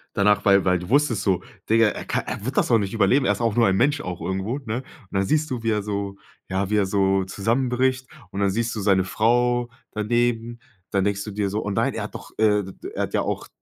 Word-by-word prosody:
danach, 105 0 +3
weil 100 -1 +5
weil 90 -1 +3
du 90 +3 -8
wusstest 140 -5 +2
so, 95 -2 +1 0.3
Digger, 115 0 +5
er - - -7
kann - - -1
er 100 - -5
wird 130 +3 -3
das - - +2
auch 115 - +6
nicht 100 -1 -3
überleben. 130 +4 +3
Er - - +4
ist - - -5
auch 115 -3 0
nur 115 -1 +5
ein 95 - +2
Mensch, 140 +7 +2
auch 90 -1 -5
irgendwo, 95 +7 -2
ne? 120 -5 -4
Und 130 - -5 0.3
dann 95 0 +1
siehst 155 +6 +1
du, 125 -3 -3
wie 115 - +2
er 105 -1 0
so 100 -1 -3 0.3
ja, 95 +1 -1
wie 105 - +2
er 100 -2 +3
so 95 0 +2
zusammenbricht. 125 +6 0 0.2
Und 95 - -6
dann 100 -1 +2
siehst 115 +3 -1
du - - -2
seine 95 -1 +3
Frau 120 +4 +1 0.2
daneben. 120 +2 0 0.3
Dann 100 - +2
denkst 100 -1 -1
du 105 - -6
dir 100 -1 -1
so: 105 +2 -2
„Oh 105 - -2
nein, 115 +6 0
er 110 - -3
hat 105 - -8
doch, - - -9
äh, 105 -1 +3
d 95 - -9
d - - -7
er - - -1
hat - - -7
ja - - +2
auch - - -3
105 Hz, 265 wpm, -23 LUFS, 100-120 Hz, 0.3 s, auch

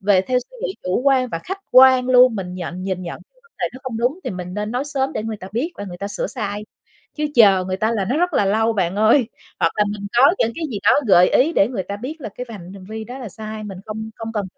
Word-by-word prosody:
về 195 -1 +4
theo 250 +5 +1
suy 250 - -11
nghĩ 390 -6 -2
chủ 185 +5 0
quan 265 -2 +3
và 165 - -3
khách 385 +1 -4
quan 255 0 +7
luôn, 250 -2 +6
mình 180 -3 -5
nhận 180 0 -6
nhìn 185 -1 -3
nhận 170 -2 -7
cái - - -31
vấn 465 - -27
đề - - 0
đó 255 - -10
không 255 -4 -4
đúng 250 +9 0
thì - - -2
mình 180 -1 -6
nên 210 +1 -3
nói 250 +4 -2
sớm 275 0 -1
để - - -3
người 220 -1 -4
ta 190 -1 -10
biết 285 +11 -2
và 205 - -6
người 175 -2 -8
ta 200 - -4
sửa 205 - -2
sai. 210 -3 -4 0.5
Chứ 300 0 -1
chờ 195 -5 +6
người 185 0 -2
ta 220 +3 0
là 210 -4 0
nó 245 +9 -1
rất 355 +1 +1
là 205 - +3
lâu 220 +3 +2
bạn 190 -2 -1
ơi, 220 +3 +4 0.3
hoặc 165 - +2
là 210 - +3
mình 200 -1 -6
có 285 +8 +6
những 230 - +1
cái 330 - -4
gì 210 - -3
đó - - +6 0.2
gợi 180 -2 +6
ý 305 +6 +3
để 200 -8 +3
người 215 -7 -3
ta 200 +2 -6
biết 290 +8 -7
là 220 - -5
cái 250 +5 -7
vành 190 -4 -9
hành 195 -2 -11
vi 220 0 -6
đó 250 +4 -8
là 245 - -6
sai, 215 +2 -7
mình 195 -3 -7
không 220 +1 -6
không 225 0 -6
cần 210 -3 -2
220 Hz, 290 wpm, -20 LUFS, 195-255 Hz, 0.5 s, quan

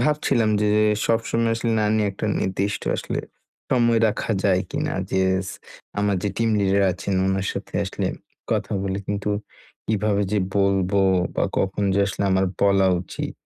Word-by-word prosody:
ভাবছিলাম 145 -7 +2
যে 105 - +2 0.4
সবসময় 115 0 +1
আসলে 115 0 -1
না - - +2
নিয়ে 105 -1 +2
একটা 95 - -4
নির্দিষ্ট 100 +2 -1
আসলে - - -3 0.5
সময় 120 -2 +3
রাখা 105 - -3
যায় 95 -2 +3
কিনা? - - -2 0.2
যে 95 - +1 0.3
স - - -4 0.5
আমার 100 -1 +1
যে 105 - 0
টিম 115 0 +1
লিডার 100 0 +2
আছেন 95 +2 -3
ওনার 95 0 0
সাথে 100 - -7
আসলে 95 - -3 0.4
কথা - - -1
বলে 95 0 -2
কিন্তু 100 0 -2 0.6
কিভাবে 105 -1 +1
যে 105 - +3 0.2
বলবো? 100 0 +2 0.3
বা - - 0 0.2
কখন 95 +1 0
যে 100 - +2
আসলে 100 - -3
আমার 95 0 +3 0.2
বলা 100 -1 +4
উচিত? - - -5
100 Hz, 160 wpm, -23 LUFS, 95-110 Hz, 0.6 s, বলা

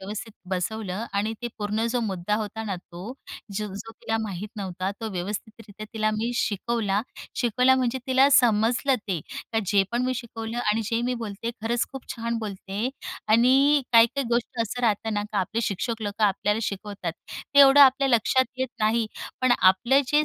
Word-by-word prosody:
व्यवस्थित 210 +3 -6 0.2
बसवलं 190 +2 -2
आणि 205 +2 0
ते 240 - -2
पूर्ण 210 +2 -1
जो 245 - +1
मुद्दा 200 -2 -1
होता 220 +1 -4
ना 200 -3 -3
तो, 180 +5 -9 0.4
जो-जो 210 +2 -5
तिला 225 0 -3
माहीत 210 -2 -4
नव्हता 185 -1 -3
तो 225 - -3
व्यवस्थितरित्या 210 +3 -6
तिला 215 -1 +1
मी 220 +3 -1
शिकवला. 210 -2 0 0.4
शिकवला 250 +2 +3
म्हणजे 255 0 0
तिला 260 +1 +5
समजलं 245 +1 +4
ते 180 -4 -1
का 225 - -4
जे 200 +1 +4
पण 240 +1 +1
मी 255 0 0
शिकवलं 230 -1 -5
आणि 220 -1 +1
जे 230 +1 0
मी 250 +1 0
बोलते 230 -1 -4
खरंच 235 +1 +1
खूप 270 -1 -8
छान 230 0 -2
बोलत 210 -3 -5
आहे 210 +6 -1 0.4
आणि 270 +5 +5
काही-काही 235 +4 +5
गोष्टी 235 0 -1
असं 235 +3 -4
राहतं 220 -1 +1
ना 205 - 0
का 205 - 0
आपले 195 +4 -1
शिक्षक 220 +3 -2
लोकं 205 +1 0
आपल्याला 210 +2 +1
शिकवतात. 200 -4 -4 0.4
ते 280 - +5
एवढं 275 +1 +8
आपल्या 270 0 +6
लक्षात 260 +2 +3
येत 260 -1 0
नाही 220 +1 +2 0.3
पण 255 -1 +4
आपलं 235 +9 +5
जे 300 0 +3
225 Hz, 175 wpm, -25 LUFS, 205-240 Hz, 0.4 s, एवढं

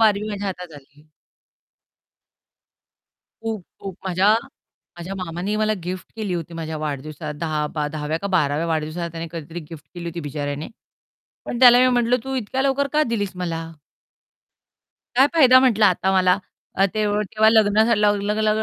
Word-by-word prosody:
Barbie 215 -1 +3
माझ्या 205 -1 -4
हातात 180 -3 -6
आली. 140 +2 -24 2.4
खूप, 220 -5 -4 0.2
खूप. 195 -2 -7
माझ्या 190 +4 +3 0.6
माझ्या 185 +3 -6
मामानी 180 +4 -3
मला 215 0 +1
गिफ्ट 185 +1 -6
केली 205 -5 -3
होती 170 0 -5
माझ्या 160 -1 -5
वाढदिवसा 150 +1 -5
10 155 -2 -1
बा 150 -2 -1
10व्या 155 +1 -3
का 200 - -1
12व्या 150 +1 +1
वाढदिवसाला 160 +1 -2
त्याने 165 0 -5
कधीतरी 165 +1 -6
गिफ्ट 160 -3 -10
केली 175 -1 -7
होती 170 0 -5
बिचाऱ्याने. 145 0 -4 0.8
पण 240 - -4
त्याला 245 -1 +9
मी 255 - +5
म्हटलं, 245 -1 +2
"तू 265 0 -4
इतक्या 260 +2 -2
लवकर 275 +1 +1
का 305 - +3
दिलीस 205 -4 -2
मला?" 170 -2 -3 1.5
काय 265 +2 +7
फायदा 255 -5 +7
म्हटलं 225 -5 +3
आता 190 +1 +2
मला. 185 -1 +4 0.4
अ, 195 - +3
ते 215 -1 +1
व 205 0 0
तेव्हा 220 0 +4
लग्न 215 -1 +4
झालं 230 -2 +2
लाव 210 +1 +1
185 Hz, 160 wpm, -22 LUFS, 165-215 Hz, 2.4 s, त्याला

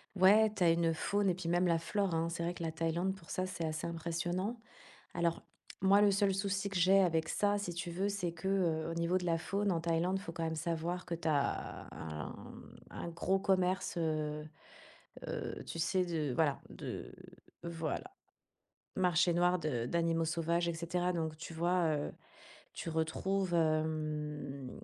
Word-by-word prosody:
Ouais! 205 +3 +6
Tu 190 - +1
as 170 - +6
une 165 0 +2
faune 200 +4 +1
et 180 - +2
puis 180 -1 -5
même 175 +1 +3
la 170 - +3
flore 185 +2 0
hein! 165 +1 +1
C'est 170 0 -3
vrai 175 - -1
que 175 - -6
la 165 - -1
Thaïlande, 165 +4 0
pour 175 -4 -16
ça, 185 - -1
c'est 185 -3 -4
assez 155 0 -2
impressionnant. 175 +6 -2 0.6
Alors, 170 -1 0 0.4
moi, 195 +2 +6
le 205 - +6
seul 195 0 +2
souci 195 +1 -1
que 195 - -5
j'ai 185 +3 +6
avec 165 -3 +2
ça, 205 0 +2
si 200 -4 -3
tu 170 0 -4
veux, 190 +4 0
c'est 195 -4 -2
que, 170 +3 -4
heu, 165 -5 +1
au - - -3
niveau 170 +2 +1
de 180 - -1
la 165 -1 +2
faune 200 +4 0
en 165 - 0
Thaïlande, 170 +3 +1
il - - -9
faut 165 - -6
quand 165 -1 -4
même 160 0 -1
savoir 170 +2 -2
que 170 - -2
tu 165 -1 -2
as, 145 -2 -1
hem, 75 -2 -7 0.2
un - - -5
gros 170 +3 +1
commerce, 190 -2 +1
heu 155 -2 -1 0.8
heu, - - -4
tu - - -6
sais 180 +3 +2
de 160 -6 -1
voilà. 150 0 +2
De - - -6 0.5
voilà! 165 - -3 0.9
Marché 180 -1 +3
noir 175 +1 +3
de 130 -8 -1
d'animaux 165 +1 +1
sauvages 170 +1 0
et 170 - -1
cetera, 175 +2 -1
donc 160 -2 -2
tu 165 +1 -8
vois? 175 +1 +2
Heu, 145 - -3 0.6
tu - - -5
retrouves, 175 +4 0
hem, 155 -4 -1
170 Hz, 185 wpm, -34 LUFS, 160-185 Hz, 0.9 s, Ouais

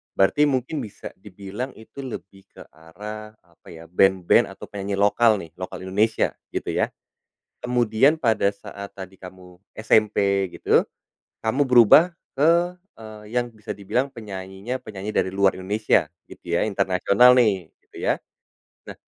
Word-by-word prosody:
Berarti 145 +10 +3
mungkin 135 +2 -2
bisa 105 - -9
dibilang 100 +6 -7
itu 125 +5 -11
lebih 95 -6 -9
ke - - -14
arah, 105 +7 -10
apa 85 -1 -27
ya, 80 0 -11
ben-ben 95 0 +3
atau - - -11
penyanyi 100 0 -4
lokal 105 +1 +4
nih, 80 -4 -10
lokal 95 0 -6
Indonesia, 105 +4 +1 0.2
gitu - - -4
ya. - - 0 0.7
Kemudian 125 +4 +3
pada 110 -4 +2
saat 100 0 -10
tadi 95 0 -10
kamu 90 -1 -13 0.2
SMP 100 -3 +2
gitu, - - +3 0.6
kamu 120 +6 +1
berubah 125 - +7 0.3
ke, 170 +4 +3 0.2
eee, 110 -1 -11 0.2
yang 120 - -3
bisa 105 0 -12
dibilang 120 +7 -1
penyanyinya 100 +2 -6
penyanyi 105 -1 -6
dari 95 - +1
luar 100 -1 +3
Indonesia, 105 +4 +1 0.2
gitu 85 -1 -6
ya, - - +1
internasional 100 +4 +4
nih, 100 -9 +2 0.2
gitu - - -20
ya. - - +1 0.7
Nah, - - -8
105 Hz, 140 wpm, -23 LUFS, 95-115 Hz, 0.7 s, berubah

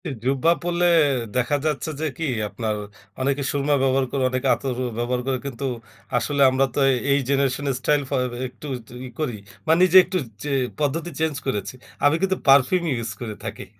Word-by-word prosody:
এ - - -2 0.2
জুব্বা 135 +5 +3
পরলে 175 0 0 0.5
দেখা 125 +3 +1
যাচ্ছে 155 0 -1
যে - - 0
কি 165 - -2 0.2
আপনার 110 -1 -2 0.5
অনেকে 140 +2 0
সুরমা 145 +1 +1
ব্যবহার 135 0 +2
করে, 135 -2 0
অনেকে 130 0 -1
আতর 130 -2 -4 0.2
ব্যবহার 125 +1 -1
করে, 130 -1 +1
কিন্তু 135 0 -4 0.5
আসলে 140 +3 0
আমরা 130 +1 +2
তো - - -1
এই, 130 - +1
এই 140 - +4
জেনারেশন 140 0 +1
এর 135 - 0
স্টাইল 145 +2 +2
ফ - - -20 0.3
এ - - -7
একটু, 125 +4 -11
একটু 115 +1 -16
ই - - -6
করি। 140 -7 -1 0.3
বা - - +4
নিজে 185 0 +6
একটু 185 +1 -2 0.3
চে 145 - -3 0.3
পদ্ধতি 150 +4 -1
চেঞ্জ 160 -2 0
করেছি। 105 -5 -2 0.3
আমি 145 +2 +5
কিন্তু 190 -1 +1
পারফিউম 140 +6 +5
ইউজ 115 -3 -3
করে 110 -3 -5
থাকি। 110 -2 -6
135 Hz, 190 wpm, -23 LUFS, 125-150 Hz, 0.5 s, নিজে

